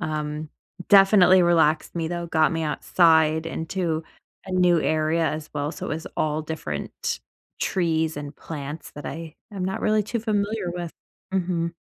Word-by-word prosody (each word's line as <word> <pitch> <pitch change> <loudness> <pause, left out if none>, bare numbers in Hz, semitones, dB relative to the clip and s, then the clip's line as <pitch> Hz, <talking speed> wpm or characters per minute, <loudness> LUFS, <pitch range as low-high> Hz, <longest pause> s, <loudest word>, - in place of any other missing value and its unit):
um, 155 -1 -3 0.4
definitely 195 -2 +7
relaxed 165 -2 +3
me, 165 -1 -1
though, 175 0 -3
got 160 -1 +2
me 165 -1 -1
outside 160 0 +3
into 165 0 -2 0.4
a 190 - -6
new 180 -2 +4
area, 155 +2 +1
as 155 +1 -4
well. 145 +2 -2
So, - - -6
it - - -5
was 160 +1 -4
all 155 0 0
different 150 - -4 0.4
trees, 160 -4 0
and 145 -1 -6
plants 150 0 -7
that 145 - -9
I 160 -1 -6 0.2
am 190 -2 -3
not 190 +1 -2
really 215 0 +2
too 230 +2 -2
familiar 210 -3 -1
with. 175 -2 -5 0.4
Mhm. 170 -2 0
165 Hz, 155 wpm, -24 LUFS, 155-180 Hz, 0.4 s, definitely